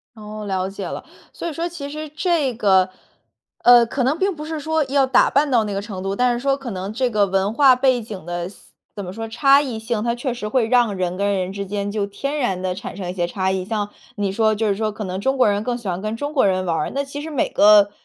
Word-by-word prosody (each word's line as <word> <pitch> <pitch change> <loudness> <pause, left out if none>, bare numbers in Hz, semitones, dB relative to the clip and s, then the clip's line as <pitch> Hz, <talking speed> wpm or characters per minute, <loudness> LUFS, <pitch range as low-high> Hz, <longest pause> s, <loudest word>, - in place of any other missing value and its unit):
哦， 215 -1 -8
了 190 -1 -1
解 195 0 -6
了。 - - -6 0.3
所 - - -5
以 330 - -4
说 335 +3 -2
其 305 -5 -7
实 305 +1 -6
这 310 -3 0
个 190 -4 +3 0.7
呃， 240 -1 +8
可 255 +3 -2
能 275 +6 +1
并 385 0 0
不 300 0 -7
是 315 0 -4
说 315 +1 0
要 270 0 +2
打 260 - +4
扮 285 +1 +2
到 235 -3 +4
那 205 -2 -4
个 200 - -2
程 200 -3 -7
度， 195 +1 -2
但 245 +2 +2
是 240 - -2
说 275 +2 +1
可 270 -4 -7
能 190 +1 -4
这 250 +3 0
个 210 -3 +2
文 195 +2 0
化 265 0 +6
背 255 -1 +2
景 210 -6 -8
的 175 +1 -4
思 195 - -18 0.2
怎 200 -2 -5
么 180 - -7
说， 225 +2 -5
差 275 +5 +4
异 255 -6 -4
性， 220 -1 -2
它 235 0 0
确 250 +1 -3
实 235 -3 -5
会 230 0 +1
让 240 -4 +3
人 180 -1 -2
跟 200 0 +1
人 185 0 -2
之 200 0 -4
间 205 0 -3
就 205 -1 -1
天 275 +8 -4
然 190 -8 -1
地 185 -1 -1
产 190 0 -8
生 190 -3 -5
一 - - -3
些 175 -2 -1
差 190 +1 -1
异。 190 -1 -1
像 205 +1 -2 0.3
你 200 -2 -1
说 220 +1 +2
就 220 0 0
是 200 - +1
说 215 +1 -1
可 210 +1 -6
能 190 0 -4
中 265 +4 0
国 255 - +4
人 205 0 +1
更 245 +1 -2
喜 235 -5 -9
欢 180 0 -2
跟 215 +2 -3
中 290 +5 -4
国 260 -8 +3
人 185 -1 0
玩 170 -2 0
儿， 150 - -2
那 280 - 0
其 280 +1 -7
实 315 - -6
每 290 -5 0
个 205 -1 +6
220 Hz, 300 characters per minute, -21 LUFS, 195-265 Hz, 0.7 s, 呃